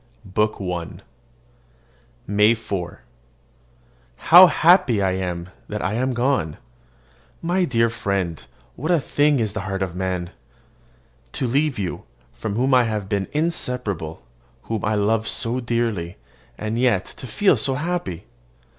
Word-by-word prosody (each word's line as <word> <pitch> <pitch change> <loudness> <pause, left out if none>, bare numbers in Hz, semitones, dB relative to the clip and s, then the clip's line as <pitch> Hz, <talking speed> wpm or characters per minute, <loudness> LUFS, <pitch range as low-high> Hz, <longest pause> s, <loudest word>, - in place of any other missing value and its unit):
BOOK 105 +3 0
I 90 -3 -5 1.2
MAY 105 +3 +4
4. 95 -6 -5 1.1
How 180 - +8
happy 170 - +4
I 95 -1 +1
am 90 -2 -3 0.2
that 105 0 -4
I 95 - -1
am 130 +3 0
gone! 120 - 0 0.9
My 180 +2 +1
dear 115 -5 +2
friend, 100 -7 -2 0.3
what 155 +6 -4
a 175 -2 +4
thing 145 0 +2
is 110 -3 -1
the 110 - -3
heart 95 0 -3
of 90 -2 -5
man! 90 -1 -3 1.0
To - - -1
leave 140 +3 +1
you, 95 -4 -4 0.3
from 105 -2 -4
whom 130 +4 +1
I 125 -1 +5
have 105 -3 -3
been 100 -2 -1
inseparable, 125 - -2 0.4
whom 110 -3 -4
I 110 +1 +1
love 110 +2 +1
so 120 +2 +1
dearly, 115 -8 -2 0.4
and 110 +2 -3
yet 120 -7 +2
to 130 - -7
feel 180 - +3
happy! 130 - -1
110 Hz, 135 wpm, -22 LUFS, 95-130 Hz, 1.2 s, How